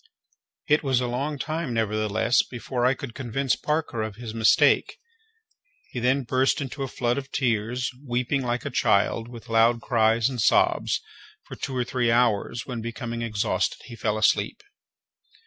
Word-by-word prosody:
It 150 +1 +4
was 135 -4 +1
a 125 - -1
long 135 +5 -2
time, 155 -3 -3
nevertheless, 110 +1 +2
before 125 0 -2
I 130 - +2
could 130 -4 -7
convince 130 +1 -1
Parker 150 -7 -2
of 110 -1 -4
his 115 -1 -7
mistake. 110 -1 +3 0.9
He - - -4
then 130 +3 +2
burst 130 +4 +1
into 140 0 -5
a 135 - -1
flood 120 +1 -1
of 140 0 -10
tears, 120 0 0 0.2
weeping 125 +1 -1
like 125 -1 -2
a - - -3
child, 105 +3 +2
with 120 -2 -11
loud 115 +1 +3
cries 115 -1 +2
and 125 -4 -3
sobs, - - +2 0.4
for - - -10
two 135 - -5
or 125 - +1
three 120 -1 0
hours, 115 -1 +1
when 120 -3 -5
becoming 115 +1 -5
exhausted, 110 -3 -1
he 120 - -10
fell 110 -1 -1
asleep. 265 - +1
120 Hz, 165 wpm, -25 LUFS, 115-130 Hz, 0.9 s, It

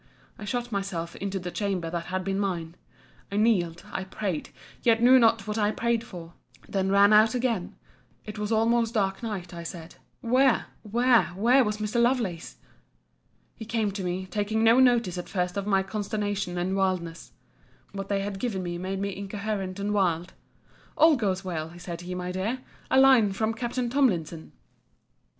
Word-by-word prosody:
I 210 - -7
shut 245 +3 -3
myself 195 -5 -3
into 195 0 -3
the 180 -1 -5
chamber 185 -5 -2
that 170 -1 -3
had 185 0 -2
been 195 0 -1
mine; 170 -5 -2 0.6
I - - -4
kneeled, 180 -7 +1
I 190 - -3
prayed; 190 -4 -4 0.3
yet 230 -1 +3
knew 255 +2 +7
not 230 -1 +3
what 215 +1 -3
I 205 -1 +2
prayed 235 +1 0
for: 175 -6 -10 0.3
then 190 -1 -1
ran 200 +1 +5
out 215 +2 +5
again: 235 -7 -1 0.5
it 210 0 -7
was 210 +1 -3
almost 230 +1 +2
dark 195 -1 0
night, 195 -6 -5
I 170 - -6
said: 170 0 -9 0.2
where, 255 +1 +3 0.2
where, 240 +2 +3
where 245 +7 +4
was 210 -2 -2
Mr. 215 +3 0
Lovelace? 235 -9 -1 1.0
He - - -8
came 220 -2 -1
to 195 -1 -5
me, 180 +1 -3
taking 210 +3 -1
no 230 +3 +6
notice 235 -8 +3
at 175 - -7
first 180 -1 -2
of 200 0 -3
my 195 -2 +3
consternation 205 -2 -3
and 180 +2 -1
wildness, 185 -4 -2 0.6
[what 195 0 -6
they 200 -1 0
had 195 -1 -4
given 200 -6 -2
me 175 -1 -4
made 190 +2 -3
me 200 -1 -3
incoherent 200 -1 -4
and 205 +1 -1
wild:] 175 -4 0 0.6
All 320 -1 +6
goes 195 -6 -1
well, 165 -1 -5
said 175 -1 -7
he, 180 +1 -6
my 180 0 -4
dear!—A 230 +7 -2
line 255 -7 +6
from 220 +3 -1
Capt. 240 +1 -5 0.2
Tomlinson! 175 - 0
200 Hz, 170 wpm, -27 LUFS, 180-225 Hz, 1.0 s, knew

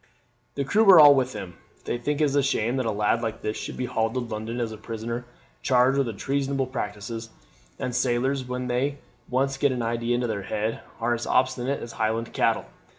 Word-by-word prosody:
"The 140 - 0
crew 205 +11 +3
are 180 -4 +10
all 145 -2 +10
with 130 -2 0
him. 95 -5 -7 0.3
They 120 - -2
think 145 +5 -1
it 145 -2 +2
a 145 - +5
shame 130 -2 0
that 130 -3 0
a - - +1
lad 105 0 +1
like 115 -1 -4
this 105 - -2
should - - -6
be 125 - -1
hauled 115 -1 -1
to - - +1
London 115 0 -4
as 115 -2 -2
a 110 - -7
prisoner 115 +2 -5 0.4
charged 130 +1 +3
with 115 -7 -1
treasonable 135 +1 -1
practices; 115 -2 -5 0.5
and 125 - -3
sailors, 130 +2 +1
when 125 0 -3
they 130 +3 0 0.3
once 135 +2 0
get 140 0 +2
an 125 -2 -2
idea 115 +1 0
into 120 0 0
their 110 -4 -2
head, 105 +3 -2 0.2
are 120 +1 +1
as 120 0 -3
obstinate 130 +1 +1
as 115 - -7
Highland 110 +1 -2
cattle. - - +1
120 Hz, 210 wpm, -25 LUFS, 115-135 Hz, 0.5 s, are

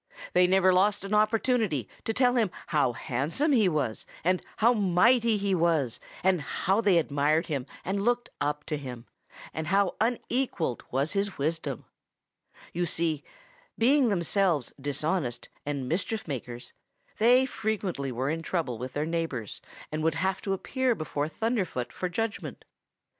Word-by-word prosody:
They 180 0 +5
never 190 0 +4
lost 200 +2 +3
an 195 +1 -4
opportunity 215 - +2 0.2
to - - 0
tell 245 +2 +3
him 230 -5 +2 0.2
how 145 -5 +3
handsome 145 - -1
he 220 -8 +4
was, 145 -9 -2 0.2
and 185 +2 +2 0.2
how 235 +3 +5
mighty 220 +3 +4
he 200 -1 0
was, 165 -8 +1 0.2
and 185 -3 +3
how 195 +8 0
they 200 -5 +4
admired 150 +1 +2
him 140 -4 -3 0.2
and 195 +2 -1
looked 240 +1 0
up 150 0 -1
to 155 0 -3
him, 125 -4 -8 0.5
and 160 -1 -4
how 195 +2 +2
unequaled 235 - -1
was 135 +4 0
his 200 -1 -1
wisdom. 145 -3 -2 0.9
You 175 +1 0
see, 160 -2 -1 0.5
being 260 +2 +4
themselves 175 - +1
dishonest 145 -2 -2 0.2
and 140 -3 -2
mischief 200 - -2
makers, 120 -3 -6 0.5
they 250 +4 +6
frequently 200 - -2
were 130 +4 -1
in 165 +1 -2
trouble 155 -9 -2
with 130 +1 -5
their 150 +1 -1
neighbors 160 -9 -3 0.3
and 155 +1 -2
would 160 0 +1
have 190 +3 0
to 195 - -1
appear 255 +5 0
before 150 -4 -2
Thunderfoot 190 - -2
for 180 - -3
judgment. 225 +4 -4
175 Hz, 150 wpm, -28 LUFS, 145-210 Hz, 0.9 s, they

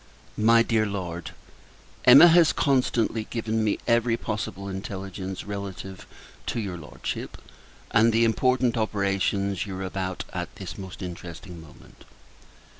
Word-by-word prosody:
MY 115 +2 +5
DEAR 110 -2 +1
LORD, 90 -4 -5 0.8
Emma 135 +6 +10
has 165 -2 +5
constantly 120 -5 +1
given 110 -1 -2
me 105 - +1
every 115 -1 +2
possible 105 -3 -4
intelligence 95 -1 -6
relative 100 -2 -7 0.4
to - - -1
your 100 -5 -4
Lordship, 80 -4 -6 0.5
and 115 0 +5
the 115 +1 +3
important 125 +1 +2
operations 100 -2 0
you 95 -2 -5
are 95 - -4
about 95 -1 -3
at - - -5
this 90 -2 -7
most 95 -1 -8
interesting 90 0 -8
moment. 80 -2 -17
100 Hz, 125 wpm, -26 LUFS, 95-115 Hz, 0.8 s, Emma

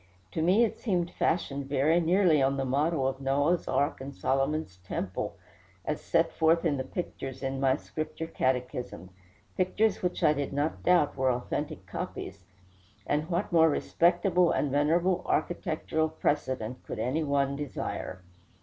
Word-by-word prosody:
To 160 - -2
me 185 +8 +4
it 230 - -1
seemed 180 -6 0
fashioned 140 -5 -1
very 145 +5 +3
nearly 170 -3 +4
on 135 +1 +2
the 135 - -1
model 140 +1 +1
of 135 0 -3
Noah's 145 +6 +1
ark 145 -1 0
and 135 +1 -7
Solomon's 135 - -1
temple, 95 +1 -4 0.5
as 150 - -2
set 165 -1 +2
forth 165 +1 +3
in 150 -4 +2
the 130 - -2
pictures 135 -3 -6
in 135 0 -2
my 135 -1 +3
Scripture 155 +2 -5
Catechism 125 - -2 0.4
pictures 195 +3 +1
which 180 -1 -2
I 150 - +6
did 145 -2 -3
not 145 +3 -1
doubt 175 -5 +3
were 130 -1 +2
authentic 120 0 -3
copies; 95 -1 -6 0.6
and 150 +3 -1
what 180 +4 -1
more 160 -1 +6
respectable 175 +3 +2
and 145 - 0
venerable 170 +6 +2
architectural 160 -1 0
precedent 130 -6 -2
could - - -6
any 130 +8 0
one 140 -1 +1
desire? 130 -9 -5
150 Hz, 150 wpm, -29 LUFS, 135-170 Hz, 0.6 s, I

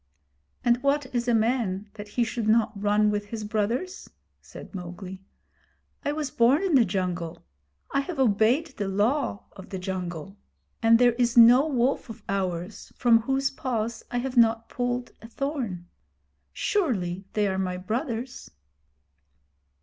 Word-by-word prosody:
'And 240 0 +3
what 280 +1 +1
is 240 0 -1
a 240 - +3
man 215 -4 0
that 210 -1 -9
he 240 +4 0
should 230 -1 -3
not 220 0 +3
run 210 +1 +2
with 205 0 -2
his 220 0 -5
brothers?' 225 - -2 0.3
said - - -12
Mowgli. 185 +1 -7 0.8
'I 290 - 0
was 300 -3 -3
born 255 +9 +3
in 380 -4 0
the 260 -4 +6
jungle. 175 -3 -3 0.5
I 275 - +1
have 315 +3 -4
obeyed 240 +4 +3
the 200 - -2
Law 210 +3 0
of 190 -1 -12
the 190 - -4
Jungle, 185 0 -5 0.4
and 230 0 +6
there 245 0 +4
is 240 -1 +1
no 245 +5 +8
wolf 260 -2 0
of 225 - -10
ours 185 0 -3
from 235 -2 +5
whose 270 +3 0
paws 235 -4 -3
I 245 - -2
have 255 +1 -3
not 230 -1 +4
pulled 245 0 -2
a 225 - -10
thorn. 235 - -4 0.6
Surely 195 - -1
they 210 -1 +1
are 190 -1 -1
my 180 -1 -2
brothers!' 235 - -4
225 Hz, 150 wpm, -26 LUFS, 195-250 Hz, 0.8 s, no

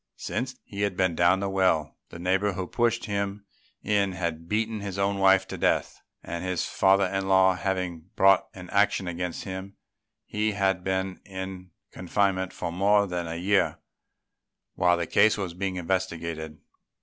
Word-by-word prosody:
Since 130 +3 -3
he 100 0 -7
had 100 -2 0
been 95 -2 +2
down 85 +3 +3
the 100 - -1
well, 95 -5 +1
the - - -9
neighbour 95 +3 +1
who 95 0 -3
pushed 120 +3 0
him 100 -1 -3 0.4
in 100 -2 +1
had 85 -2 -4
beaten 110 +1 0
his 100 -2 -5
own 100 0 0
wife 95 0 +5
to - - -6
death; - - 0 0.2
and 85 0 -5
his 90 -2 -1
father 95 +1 +3
in 95 +1 -2
law 95 -1 +5
having 90 -2 -3
brought 95 0 +5
an 90 -1 -10
action 100 -2 +2
against 90 0 -4
him, 95 +1 -7 0.5
he 105 0 -1
had 95 -2 +1
been 95 0 -2
in 95 -1 -7 0.2
confinement 95 0 0
for 85 - -4
more 100 +3 +3
than 90 -3 -3
a 80 - -4
year 95 +4 +1 1.0
while 90 0 +3
the 85 - -1
case 110 +6 +4
was 95 -4 -3
being 95 +1 -3
investigated. 85 -3 -3
95 Hz, 165 wpm, -26 LUFS, 90-100 Hz, 1.0 s, wife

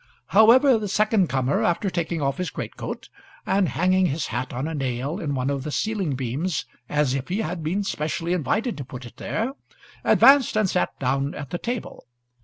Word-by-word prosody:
However, 235 +4 +6
the 210 - -3
second 210 -1 +2
comer, 135 +1 +1
after 185 +3 +1
taking 165 -2 -2
off 135 +3 -1
his 180 - -1
greatcoat - - -6 0.4
and 195 -2 +2
hanging 185 +1 +2
his 145 +1 -2
hat 125 +2 -2
on 130 +5 -3
a 160 - -4
nail 135 - -2
in 145 -6 -2
one 130 +1 0
of 140 -1 -2
the 150 - -5
ceiling 195 -3 -1
beams 135 +7 -2 0.2
as 150 -3 +1
if 135 -1 -3
he 195 +5 -1
had 170 -1 -3
been 180 +7 -1
specially 165 0 -2
invited 215 - -1
to - - -3
put 125 -1 -9
it 120 - -13
there, 230 +5 -2 0.5
advanced, 270 -5 +6
and 215 -2 +3
sat 180 0 +1
down 135 +2 0
at 145 -2 -7
the 175 - -3
table. 240 - -5
165 Hz, 195 wpm, -24 LUFS, 140-200 Hz, 0.5 s, However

